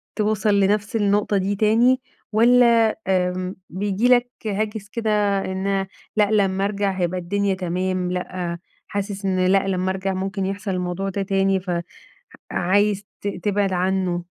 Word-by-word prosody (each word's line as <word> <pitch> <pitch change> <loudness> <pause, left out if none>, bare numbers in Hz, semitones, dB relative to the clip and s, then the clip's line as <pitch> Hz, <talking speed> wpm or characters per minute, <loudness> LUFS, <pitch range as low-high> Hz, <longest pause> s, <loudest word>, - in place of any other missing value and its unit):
توصل 210 -1 +1
لنفس 205 +4 +1
النقطة 205 -1 +2
دي 195 +2 0
تاني، 235 +5 +3 0.3
والّا 230 0 +5
آمم 185 0 0
بييجي 205 +5 0
لك 245 -1 +4 0.2
هاجس 210 0 -3
كده 210 -3 +1
إن 195 +1 -1 0.3
لأ 210 0 +3
لمّا 195 -2 +2
أرجع 200 -1 0
هيبقى 185 -1 -1
الدنيا 200 +2 0
تمام، 185 0 -2
لأ 180 -1 -4 0.3
حاسس 200 -1 -4
إن 185 -1 +1
لأ 195 +1 +3
لمّا 185 0 0
أرجع 190 0 -2
ممكن 190 +1 -2
يحصل 195 +1 -3
الموضوع 180 +1 -2
ده 195 +1 -3
تاني 195 0 +1 0.9
فعايز 205 +2 +1 0.2
ت 205 - -3
تبعد 200 -1 -1
عنه؟ 180 -1 0
195 Hz, 140 wpm, -22 LUFS, 185-210 Hz, 0.9 s, والّا